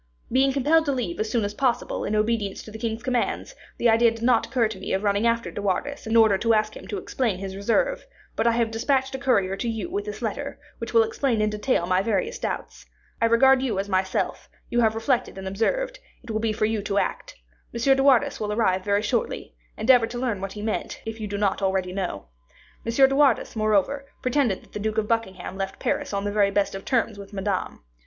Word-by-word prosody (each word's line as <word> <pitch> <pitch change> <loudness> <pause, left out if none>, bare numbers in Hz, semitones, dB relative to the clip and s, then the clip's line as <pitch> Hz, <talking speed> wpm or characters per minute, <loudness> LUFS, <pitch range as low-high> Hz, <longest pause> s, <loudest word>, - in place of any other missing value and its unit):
Being 265 +2 +4
compelled 300 +4 +3
to 285 - +1
leave 240 -11 -3
as 215 0 -1
soon 225 -3 +1
as 205 - -3
possible, 250 +2 -1
in 215 - -1
obedience 215 -2 0
to 215 - -11
the 220 - -8
king's 225 0 -3
commands, 250 - -1 0.2
the 240 - +2
idea 230 +1 +5
did 230 0 -7
not 240 -1 +3
occur 245 -4 +2
to 215 - -8
me - - -4
of 190 +2 0
running 205 +2 +2
after 230 0 0
De - - -5
Wardes 225 +8 -2
in 225 - 0
order 220 -4 +5
to 230 0 +3
ask 215 0 0
him - - -10
to 205 - -4
explain 220 +1 -1
his 190 0 -6
reserve; 240 - 0 0.3
but - - +1
I 235 - +4
have 230 -1 +1
dispatched 265 +4 0
a 265 - -4
courier 200 -8 +2
to 235 - -2
you 225 +9 -4
with 405 +2 -2
this 425 - -6
letter, - - -3 0.2
which - - -5
will 460 - +6
explain 280 - 0
in 215 0 +1
detail 210 -3 0
my 185 +1 +2
various 455 - -1
doubts. - - -5 0.3
I - - +5
regard 260 +3 +5
you 240 -7 -1
as 195 +1 -1
myself; 190 -1 -1 0.2
you 240 - +2
have 220 -2 +3
reflected 240 0 0
and 190 0 -6
observed; - - -1 0.2
it 240 - -7
will 215 - -1
be 225 -1 +1
for 215 - 0
you 220 -1 0
to 200 0 -2
act. - - -2 0.4
M. 235 - -5 0.2
de 270 - +1
Wardes 270 -3 +4
will 210 -1 -2
arrive 190 -4 +1
very 205 +1 +1
shortly; 230 +2 -2 0.2
endeavor 235 +1 +5
to 240 +1 -6
learn 240 -6 -2
what 195 0 -4
he 210 - -7
meant, 220 - -3
if 225 0 -5
you 210 - -3
do 200 0 -3
not 200 -1 0
already 190 -1 0
know. 180 - -3 0.6
M. - - +1
de 270 +3 +4
Wardes, 275 -6 +3
moreover, 215 +6 +1 0.2
pretended 255 -6 +1
that - - -22
the - - -4
Duke 215 +1 -2
of 215 -1 +1
Buckingham 190 -5 -2
left 195 0 -3
Paris - - -1
on 200 -1 -2
the 205 - -1
very 205 -1 +3
best 200 0 0
of 195 0 -7
terms 230 -4 0
with 200 +1 -11
Madame. 195 - -3
225 Hz, 235 wpm, -25 LUFS, 200-250 Hz, 0.6 s, will